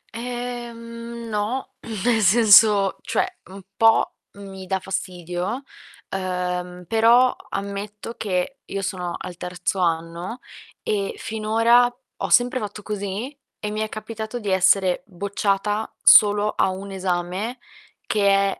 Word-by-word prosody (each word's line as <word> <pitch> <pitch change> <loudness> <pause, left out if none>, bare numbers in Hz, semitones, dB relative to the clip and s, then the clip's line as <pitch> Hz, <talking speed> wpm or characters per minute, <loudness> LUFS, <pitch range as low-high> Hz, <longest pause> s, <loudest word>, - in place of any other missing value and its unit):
Ehm, 235 -1 -6
no, 215 +4 -2 0.3
nel 235 -2 +3
senso, 205 -1 +6
cioè 370 - 0 0.2
un 190 +1 -11
po' 225 0 +4 0.2
mi 195 -2 -10
dà 190 +1 0
fastidio, 180 +4 -4 0.5
ehm, 180 -1 -3
però 235 +4 +5
ammetto 200 +2 -5
che 200 +6 -2
io 195 0 -5
sono 180 -2 -3
al 175 - -8
terzo 180 +2 -3
anno 170 +4 -1 0.5
e 200 -2 -1
finora 230 +3 +3 0.3
ho - - -3
sempre 245 +1 +4
fatto 210 -1 -6
così 210 +5 -4 0.2
e 210 - -4
mi 215 - -3
è 220 - -2
capitato 220 +1 -6
di 210 -4 -4
essere 190 0 +3
bocciata 200 +2 -1
solo 205 0 +7
a - - +3
1 195 +1 -6
esame 185 +5 -2 0.5
che 200 -2 +2
205 Hz, 120 wpm, -23 LUFS, 190-230 Hz, 0.5 s, solo